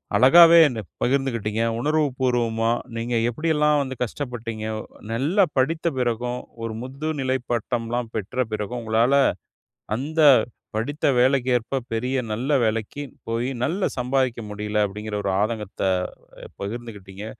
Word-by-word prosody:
அழகாவே 170 +6 +8
என்ன 120 -5 -4 0.2
பகிர்ந்துகிட்டிங்க, 120 -5 0 0.2
உணர்வு 150 +4 +2
பூர்வமா. 115 -3 +1 0.3
நீங்க 120 +1 -2
எப்படியெல்லாம் 150 +2 +2
வந்து 130 -1 -4
கஷ்டப்பட்டீங்க, 115 -3 -5 0.5
நல்லா 150 - +2
படித்த 160 +6 +1
பிறகும் 125 0 -1 0.2
ஒரு 115 -1 -3
முதுநிலை 135 0 -2
பட்டம்லாம் 120 0 -2
பெற்ற 115 +5 -1
பிறகும், 110 +3 -3
உங்களால 115 +3 +2 0.8
அந்த 155 +6 -1 0.5
படித்த 145 +8 -1
வேலைக்கேற்ப 125 0 +2
பெரிய 125 +4 -1
நல்ல 120 +7 -2
வேலைக்கு 110 +5 -1 0.3
போய் 115 +3 -1
நல்லா 180 +9 0
சம்பாதிக்க 125 -1 0
முடியல. 105 0 -3
அப்படிங்கிற 105 +2 -5
ஒரு - - 0
ஆதங்கத்தை 105 -3 -2 0.7
பகிர்ந்துகிட்டிங்க. 100 -2 -7
120 Hz, 110 wpm, -23 LUFS, 110-135 Hz, 0.8 s, அழகாவே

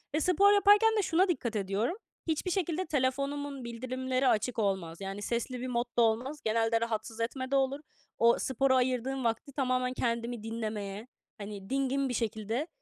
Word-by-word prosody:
ve - - +2
spor 380 +5 +5
yaparken 410 +2 +6
de 420 - +4
şuna 365 +2 +3
dikkat 240 -10 -1
ediyorum. 205 - -1 0.3
Hiçbir 325 +3 -1
şekilde 360 -1 -1
telefonumun 280 -1 -1
bildirimleri 255 +2 -2
açık 225 +2 +1
olmaz. 190 -5 -1
Yani 195 +1 -5
sesli 240 +3 -2
bir 255 - -3
modda 240 -1 0
olmaz. 245 +6 +1
Genelde 225 +1 +2
"rahatsız 225 0 -3
etme"de 260 +3 -2
olur. 270 +1 +1 0.4
O 235 0 +5
spora 265 0 +2
ayırdığım 255 +1 0
vakti 230 +4 -1
tamamen 255 -2 0
kendimi 235 -2 -2
dinlemeye, 215 -1 -4 0.3
hani 200 -2 -8
dingin 270 0 0
bir - - -2
şekilde, 225 - -2
250 Hz, 155 wpm, -30 LUFS, 225-275 Hz, 0.4 s, yaparken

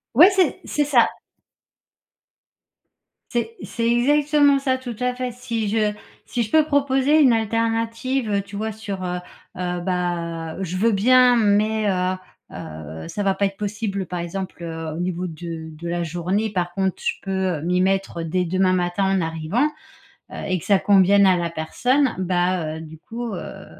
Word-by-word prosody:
Ouais, 345 - +9
c'est 375 - +2
c'est 295 -1 0
ça. 255 -5 +5 2.2
C'est 230 -1 -2
c'est 230 - -3
exactement 285 +3 +4
ça, 260 -1 0
tout 245 -3 -6
à 250 0 0
fait 250 0 -3
si 230 -3 -3
je 210 -1 +1 0.3
si 245 - -2
je 215 - -2
peux 315 -1 +5
proposer 285 0 +3
une 260 -4 +6
alternative, 230 +2 0
heu, 200 - +1
tu 200 +1 -11
vois, 220 +2 -2
sur 205 -3 -6
heu, 180 0 -2 0.4
heu, 180 -1 -2
bah, 170 -3 -2
heu, 190 - -3
je 185 0 -3
veux 225 +4 +3
bien 250 +4 +5
mais, 215 0 +2
heu, 185 -1 +1 0.4
heu, 80 +1 -8
ça 205 - -4
va 195 -1 +1
pas 200 - +1
être 195 0 -2
possible, 205 -2 -3
par 180 - -4
exemple, 175 +1 -5
heu, 160 -2 -5
au 165 - -5
niveau 180 0 -2
de 165 -1 -7
de 160 +2 -8
la 175 0 -1
journée, 175 +6 -1
par 175 -3 -2
contre, 190 -1 0
je - - +1
peux 190 -5 -1
m'y 180 +2 +1
mettre 190 -3 0
dès 180 +3 0
demain 185 +1 +2
matin 175 +2 0
en 190 -1 +2
arrivant, 165 - 0 0.6
heu - - -8
et 185 -2 0
que - - -11
ça 200 - +4
convienne 200 0 +5
à 185 -1 +5
la 170 -1 -1
personne, 245 - +1
bah, 180 -3 0
heu, 160 - -7
du 160 0 -11
coup, 235 0 -6
heu, 180 - -4
heu, - - -9
195 Hz, 180 wpm, -22 LUFS, 175-230 Hz, 2.2 s, Ouais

